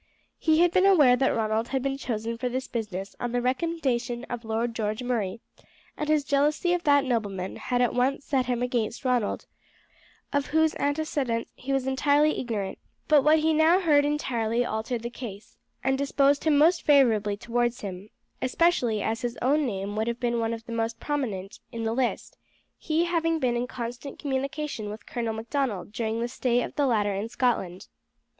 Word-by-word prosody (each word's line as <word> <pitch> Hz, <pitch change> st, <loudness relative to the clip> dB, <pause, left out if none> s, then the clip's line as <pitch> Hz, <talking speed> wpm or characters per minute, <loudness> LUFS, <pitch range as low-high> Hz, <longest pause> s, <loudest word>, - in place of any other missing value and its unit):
He 315 Hz, 0 st, +3 dB
had 350 Hz, -1 st, +4 dB
been 370 Hz, +2 st, +4 dB
aware 295 Hz, -10 st, +6 dB
that 265 Hz, +1 st, +2 dB
Ronald 220 Hz, 0 st, 0 dB
had 265 Hz, 0 st, -2 dB
been 275 Hz, 0 st, -1 dB
chosen 230 Hz, -4 st, -3 dB
for 250 Hz, +2 st, -2 dB
this 260 Hz, +1 st, -3 dB
business 205 Hz, -5 st, -5 dB
on 245 Hz, -1 st, -3 dB
the 245 Hz, -, +2 dB
recommendation 255 Hz, -3 st, -1 dB
of 240 Hz, -1 st, -4 dB
Lord 225 Hz, +1 st, -1 dB
George 215 Hz, +1 st, -2 dB
Murray, 230 Hz, -4 st, -2 dB, 0.5 s
and 300 Hz, -, -4 dB
his 305 Hz, -1 st, +3 dB
jealousy 295 Hz, +5 st, +2 dB
of 355 Hz, -, 0 dB
that 285 Hz, -2 st, +4 dB
nobleman 205 Hz, -7 st, -2 dB
had 250 Hz, -1 st, 0 dB
at 245 Hz, -, +1 dB
once 265 Hz, +3 st, 0 dB
set 260 Hz, -3 st, 0 dB
him 245 Hz, -1 st, 0 dB
against 240 Hz, -1 st, -2 dB
Ronald, 245 Hz, -5 st, 0 dB, 0.9 s
of 285 Hz, -1 st, +1 dB
whose 315 Hz, 0 st, +2 dB
antecedents 285 Hz, -5 st, -1 dB
he 275 Hz, -, -6 dB
was 270 Hz, -1 st, +1 dB
entirely 285 Hz, +3 st, +2 dB
ignorant; 215 Hz, -6 st, -3 dB, 0.3 s
but 300 Hz, -2 st, +6 dB
what 305 Hz, +2 st, +5 dB
he 315 Hz, +1 st, +2 dB
now 320 Hz, +4 st, +5 dB
heard 300 Hz, -6 st, +4 dB
entirely 245 Hz, -5 st, 0 dB
altered 225 Hz, +2 st, -3 dB
the 235 Hz, -, -4 dB
case, 215 Hz, -5 st, -9 dB, 0.3 s
and 265 Hz, +1 st, +1 dB
disposed 280 Hz, +1 st, +2 dB
him 305 Hz, -2 st, +4 dB
most 330 Hz, +4 st, +4 dB
favourably 220 Hz, -8 st, +3 dB
towards 240 Hz, +2 st, -1 dB
him, 195 Hz, 0 st, -7 dB, 0.3 s
especially 255 Hz, -, +2 dB
as 225 Hz, +2 st, -1 dB
his 240 Hz, -1 st, -3 dB
own 285 Hz, +3 st, +2 dB
name 200 Hz, -1 st, -4 dB
would 220 Hz, +1 st, -1 dB
have 235 Hz, 0 st, -2 dB
been 235 Hz, -1 st, 0 dB
one 225 Hz, 0 st, 0 dB
of 230 Hz, 0 st, -6 dB
the 235 Hz, -, -8 dB
most 230 Hz, 0 st, -2 dB
prominent 220 Hz, -10 st, -3 dB
in 230 Hz, -2 st, -5 dB
the 225 Hz, 0 st, 0 dB
list, 250 Hz, 0 st, -2 dB, 0.4 s
he 325 Hz, +2 st, +1 dB
having 330 Hz, -1 st, +1 dB
been 250 Hz, -5 st, 0 dB
in 240 Hz, +1 st, -1 dB
constant 240 Hz, +3 st, -6 dB
communication 275 Hz, -4 st, -3 dB
with 215 Hz, +1 st, -8 dB
Colonel 230 Hz, -2 st, -3 dB
Macdonald 225 Hz, -4 st, -2 dB
during 225 Hz, +1 st, -2 dB
the 235 Hz, -, 0 dB
stay 245 Hz, -1 st, 0 dB
of -, -, -6 dB
the 285 Hz, -2 st, +1 dB
latter 210 Hz, -4 st, +1 dB
in 200 Hz, +4 st, -3 dB
Scotland. 205 Hz, -8 st, -1 dB
245 Hz, 185 wpm, -26 LUFS, 225-285 Hz, 0.9 s, aware